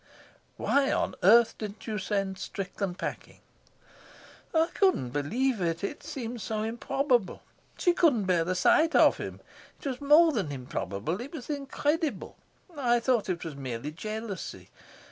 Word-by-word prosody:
"Why 275 -1 +2
on - - 0
earth 225 +4 +5
didn't 210 -1 -7
you 215 -2 -3
send 195 -1 -2
Strickland 195 -1 -4
packing?" - - -6 1.1
"I 325 +1 +2
couldn't 370 - +2
believe 220 - 0
it. 165 0 -1
It 200 - -4
seemed 245 -6 -6
so 215 +1 -2
improbable. 240 0 0 0.3
She 355 - +3
couldn't 285 - +3
bear 180 -3 +2
the 185 +2 -1
sight 315 - +4
of - - +6
him. - - -7 0.4
It - - -15
was 260 -2 -3
more 305 +4 +6
than 200 - -2
improbable; 125 - -4
it 270 +4 -7
was 305 -2 -6
incredible. 290 - -2 0.4
I 240 -4 +2
thought 235 -4 +1
it 175 -1 -2
was 160 -3 -6
merely 130 +1 -5
jealousy. 215 +4 -6
220 Hz, 145 wpm, -28 LUFS, 185-275 Hz, 1.1 s, of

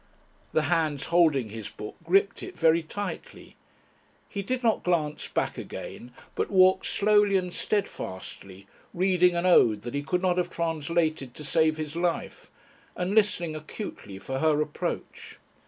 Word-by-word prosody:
The 155 - +2
hands 155 -2 0
holding 155 -9 +3
his 110 -1 -7
book 105 - -8
gripped 195 +4 +2
it - - -8
very 165 0 +4
tightly. 205 +6 -7 0.7
He 200 - -4
did 255 +5 -3
not 225 -2 +2
glance 155 -4 -1
back - - -2
again, 120 - -8 0.2
but - - -2
walked 185 -1 +4
slowly 205 -1 +3
and 180 -1 -3
steadfastly, 95 - -4 0.3
reading 180 -1 +3
an 170 +1 0
ode 115 - +5
that 120 - -6
he 145 - -1
could 180 +5 -1
not 180 -1 +2
have 175 0 -1
translated 160 -5 -1
to 150 - -8
save 155 +2 +2
his 155 0 -5
life, 170 0 -2 0.5
and 180 +2 -2
listening 185 -7 +2
acutely 155 - -7
for 130 +7 -4
her 155 0 +3
approach. 150 -1 -4
170 Hz, 150 wpm, -27 LUFS, 150-185 Hz, 0.7 s, ode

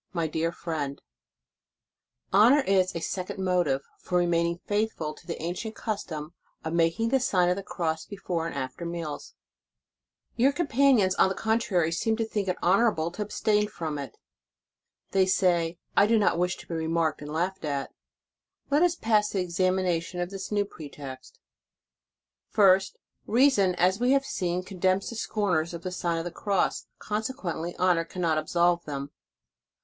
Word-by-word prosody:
MY 170 -3 0
DEAR 160 +2 -1
FRIEND: 150 -5 -4 1.3
Honor 235 +9 +6
is 190 -7 +2
a 170 - -3
second 185 +2 -4
motive 175 -8 +1 0.2
for 180 - -1
remaining 170 -1 +1
faithful 205 -7 -1
to - - -18
the 170 - -4
ancient 180 +7 -4
custom 170 -7 -4 0.3
of 160 0 -3
making 170 +7 +2
the 265 +2 +3
sien 180 -8 +2
of 180 - +2
the 200 - -4
Cross 165 -4 -3
before 180 -5 -3
and 165 - -6
after 130 +4 -5
meals. 170 - -5
o - - -59
Your 260 +4 +4
companions, 270 - +3
on 190 - +4
the 190 - -3
contrary, 220 -7 +1
seem 220 +6 0
to 225 - 0
think 210 -3 -2
it 185 - 0
honorable 185 -3 +3
to 195 - -7
abstain 210 0 +1
from 160 -7 -4
it. 135 -4 -7 0.9
They 190 -1 +3
say: 175 -3 +2 0.2
"I 200 - +6
do 225 +1 +4
not 205 -5 +2
wish 180 0 0
to - - -13
b? - - -5
remarked 160 -1 0
and 150 0 -7
laughed 180 +4 -2
at." 140 -2 -2 0.8
Let 290 +2 +4
us 350 -1 +3
pass 215 -6 +2
to - - -3
the 185 - +1
examination 180 -1 0
of 175 +1 -2
this 195 +1 -6
new 205 -1 +1
pretext. 140 -7 -10 1.1
First: 195 -2 +4 0.3
reason, 220 -7 +4
as 185 +3 +2
we 250 +2 +3
have 275 0 +2
seen, 180 -4 -2
condemns 185 +1 0
the - - -7
scorners 180 -7 -1
of 170 - -8
the 185 - -3
Sign 170 -2 -1
of 165 - -3
the 175 - -4
Cross, 195 +2 -1
conse 215 +2 -2
quently 175 -4 -4
honor 180 -2 +3
cannot 165 -2 -1
absolve 170 +2 +2
them. 140 -1 -5
180 Hz, 170 wpm, -27 LUFS, 165-205 Hz, 1.3 s, Honor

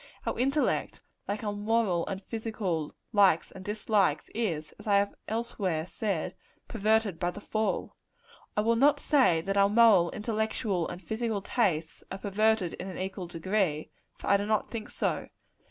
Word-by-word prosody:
Our - - -2
intellect, 275 +4 +1 0.3
like 205 +2 -3
our 205 -1 -1
moral 205 -4 +1
and 195 0 -4
physical 210 -9 -3 0.2
likes 195 -6 +4
and 190 - -10
dislikes, 210 -1 +1
is, 170 -10 -2
as - - -11
I 205 - +4
have 200 0 +2
elsewhere 200 -8 -2
said, 185 -2 -2 0.3
perverted 215 -4 +1
by 175 - +1
the 180 - -7
fall. 215 +1 -2 0.6
I - - +4
will 230 +2 +3
not 280 +4 +5
say 250 - +3
that 195 +3 -2
our 200 0 +5
moral, 210 -6 +6
intellectual 215 -4 -1
and 175 - -6
physical 220 +1 -2
tastes 175 -10 0
are 190 - -3
perverted 205 -2 +1
in - - -6
an 190 - -6
equal 190 -1 -4
degree; 175 -2 -1 0.3
for - - -10
I 200 - +5
do 205 +1 -3
not 215 -1 0
think 225 -2 -5
so. - - -2
205 Hz, 165 wpm, -29 LUFS, 185-220 Hz, 0.6 s, moral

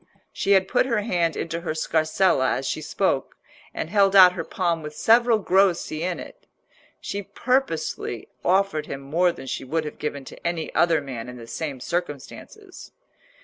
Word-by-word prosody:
She 200 - +2
had 190 -1 +4
put 250 +4 +2
her 230 -4 +1
hand 175 -6 0
into 170 0 -3
her 165 -2 -3
scarsella 160 -2 +2
as 135 - -5
she 155 - -2
spoke, 150 - -1 0.4
and - - -4
held 200 -2 +4
out 185 -2 +9
her 175 -3 -4
palm 170 -1 -1
with 150 0 -8
several 230 +5 +4
grossi 185 -5 +1
in 175 0 -2
it. - - -12 0.5
She 200 - -4
purposely 200 - -2 0.2
offered 185 -5 +1
him 140 - -6
more 170 +6 +2
than 150 - -10
she 125 0 -4
would 155 +4 -2
have 150 - -7
given 145 -2 -4
to - - -7
any 170 -2 -3
other 165 -3 +3
man 125 -4 -7
in 125 - -9
the 115 - -10
same 140 +2 -5
circumstances. 175 - -6
170 Hz, 175 wpm, -24 LUFS, 150-195 Hz, 0.5 s, out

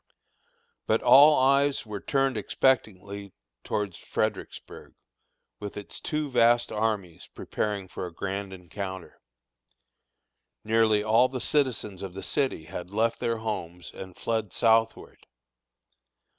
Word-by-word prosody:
But 110 - +2
all 145 +5 +8
eyes 140 +1 +3
were 105 -2 -6
turned 135 -1 +1
expectantly 100 -6 -1 0.3
towards 100 -4 -3
Fredericksburg, - - -4 0.6
with 105 -1 -7
its 105 - -6
two 150 -1 -2
vast 120 -2 +3
armies 105 -6 -2
preparing 100 -3 -3
for 90 - -6
a - - -10
grand 100 +3 -4
encounter. 95 +1 -7 1.4
Nearly 110 -1 +3
all 115 +4 +4
the 130 - -4
citizens 125 -8 0
of 95 -2 -7
the 95 - -6
city 135 - -1
had 90 +3 -7
left 115 +3 0
their 115 -1 -1
homes 90 -6 -5
and 95 -2 -10
fled 110 -4 -2
southward. 115 -1 +1
110 Hz, 115 wpm, -27 LUFS, 95-120 Hz, 1.4 s, all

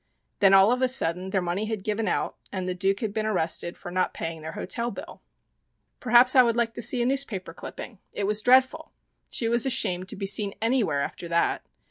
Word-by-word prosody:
Then 195 -1 +6
all 195 +3 +6
of 250 +1 0
a 260 - +4
sudden 185 -7 +1
their 190 -2 -1
money 180 +5 -2
had 215 -3 -4
given 215 +1 -2
out - - -1 0.2
and 185 -2 -4
the 185 - -1
Duke 195 +2 0
had 215 -3 -3
been 215 0 -2
arrested 175 -3 -1
for 175 - -9
not 185 0 -1
paying 165 -1 -5
their 160 +1 -7
hotel 235 +6 -4
bill. - - -10 0.8
Perhaps 245 +1 +5
I 255 - +9
would 235 -1 +1
like 235 -1 0
to 235 - -7
see 240 +1 +2
a - - -1
newspaper 240 -10 -2
clipping? 215 +4 -9
It 200 - -3
was 210 +1 0
dreadful! 260 +6 +3 0.4
She 230 - -2
was 235 +3 +2
ashamed 185 -7 -1
to - - -3
be 195 - -5
seen 200 0 0
anywhere 225 - +1
after 170 - -6
that. 170 0 0
210 Hz, 215 wpm, -25 LUFS, 185-240 Hz, 0.8 s, I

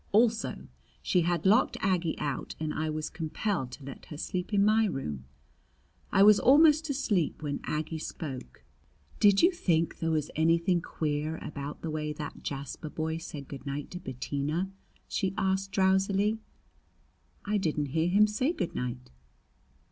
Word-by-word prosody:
Also 225 +1 +2 0.4
she 180 - +3
had 170 0 0
locked 220 +7 +4
Aggie 180 -4 0
out 145 -3 -3
and 155 -1 -2
I 155 0 -1
was 155 0 -2
compelled 165 -2 -2
to 140 - -10
let 135 -1 -9
her 150 - -8
sleep 180 +4 -3
in 200 -1 +4
my 220 +1 +4
room. 75 - -4 0.9
I 195 - +5
was 210 0 +8
almost 310 +3 +6
asleep 205 - 0
when 145 -1 -2
Aggie 155 +1 -2
spoke: 130 - -7 0.6
"Did 205 +3 +5
you 350 - +7
think 170 - 0
there 165 - 0
was 155 -2 0
anything 170 +2 +3
queer 155 0 -2
about 145 0 -6
the 165 - -2
way 150 0 -2
that 150 -1 -7
Jasper 140 +2 -5
boy 160 +1 -2
said 145 -4 -8
good 140 0 -9
night 140 +1 -4
to 180 - -6
Bettina?" 145 +5 -3 0.4
she 190 -2 -1
asked 190 0 0
drowsily. 195 +3 +2 1.1
"I 210 0 +1
didn't 150 -5 -1
hear 160 +1 +2
him 205 +4 +6
say 235 +9 0
good 180 - -3
night." 125 - -4
165 Hz, 155 wpm, -29 LUFS, 150-200 Hz, 1.1 s, was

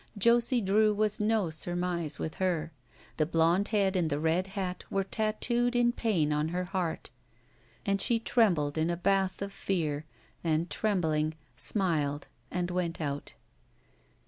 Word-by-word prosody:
Josie 235 +3 +3
Drew 210 +2 +3
was 215 0 +1
no 210 -5 +1
surmise 175 -1 -2
with 155 - -4
her. 170 -4 0 0.5
The 155 - +2
blond 170 +4 +3
head 200 -3 +1
and 175 -4 +1
the 145 - 0
red 165 +4 +1
hat 190 -2 -4
were 195 - 0
tatooed 235 +4 0
in 240 0 +4
pain 180 -12 +1
on 150 +1 +1
her 180 +2 -2
heart 180 -3 -3 0.7
and 200 -1 +1
she 235 - +3
trembled 175 -11 +2
in 160 +2 +1
a 170 - -1
bath 195 +1 +1
of 200 0 -6
fear, 155 -7 -2 0.4
and, 165 +1 0
trembling, 160 -7 0 0.2
smiled 145 - -1 0.2
and 180 0 -2
went 175 -2 -2
out. 145 -2 -4
180 Hz, 145 wpm, -30 LUFS, 160-205 Hz, 0.7 s, in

